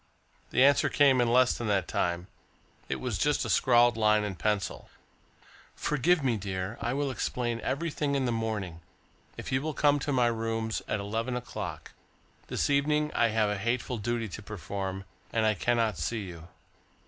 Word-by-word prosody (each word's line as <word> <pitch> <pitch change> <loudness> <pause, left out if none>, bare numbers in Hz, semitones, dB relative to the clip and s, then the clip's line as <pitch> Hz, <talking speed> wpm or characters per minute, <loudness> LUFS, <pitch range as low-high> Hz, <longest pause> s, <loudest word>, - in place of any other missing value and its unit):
The 130 - +3
answer 140 +1 +5
came 135 -3 +4
in 120 -1 +2
less 125 +1 +4
than 120 - -4
that 100 -3 +1
time. 85 0 -1 0.6
It - - 0
was - - -3
just - - +1
a - - -1
scrawled 120 -2 +4
line 105 -1 +3
in 105 -2 -3
pencil: 105 +1 -2 0.9
"Forgive 155 +3 +1
me, 120 -4 +1
dear. 95 +1 -4
I 120 - -1
will 140 -1 -1
explain 120 -2 -2
everything 145 -1 -1
in 135 -2 +1
the 120 - 0
morning, 110 -7 -3 0.6
if - - -6
you 130 0 +1
will 155 0 -3
come 145 -1 +3
to 145 +1 -2
my 125 -3 +3
rooms 115 -1 -1
at 105 - -1
eleven 115 +5 -2
o'clock. 125 0 -6 0.6
This - - 0
evening 150 +2 +2
I 120 - +3
have 110 -2 +1
a 105 - -2
hateful 120 +2 -1
duty 115 +1 -2
to 100 - -7
perform 95 -1 -5 0.3
and 110 -1 +1
I 110 - +4
cannot 115 -2 0
see 110 +9 -2
you." 85 -3 -9
115 Hz, 175 wpm, -29 LUFS, 105-130 Hz, 0.9 s, answer